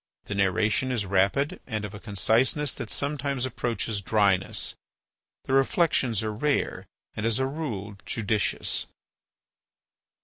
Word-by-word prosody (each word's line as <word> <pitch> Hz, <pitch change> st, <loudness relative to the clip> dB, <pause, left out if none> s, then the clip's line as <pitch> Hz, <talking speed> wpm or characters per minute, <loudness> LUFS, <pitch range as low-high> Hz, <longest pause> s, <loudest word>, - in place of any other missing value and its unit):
The -, -, -4 dB
narration 105 Hz, +6 st, +2 dB
is 115 Hz, -5 st, 0 dB
rapid 100 Hz, -, +1 dB
and 110 Hz, -3 st, -2 dB
of 105 Hz, -, -7 dB
a 105 Hz, -, -8 dB
conciseness 115 Hz, -, +2 dB
that 105 Hz, -, -6 dB
sometimes 140 Hz, -2 st, -1 dB
approaches 115 Hz, -4 st, -2 dB
dryness. 100 Hz, -2 st, +2 dB, 0.7 s
The -, -, -3 dB
reflections 135 Hz, -, +2 dB
are 110 Hz, -1 st, -2 dB
rare 145 Hz, +7 st, -1 dB, 0.3 s
and, 110 Hz, -, -3 dB
as 115 Hz, -1 st, +2 dB
a 130 Hz, -, +1 dB
rule, 120 Hz, -9 st, -4 dB
judicious. 110 Hz, -2 st, 0 dB
110 Hz, 125 wpm, -27 LUFS, 100-135 Hz, 0.7 s, narration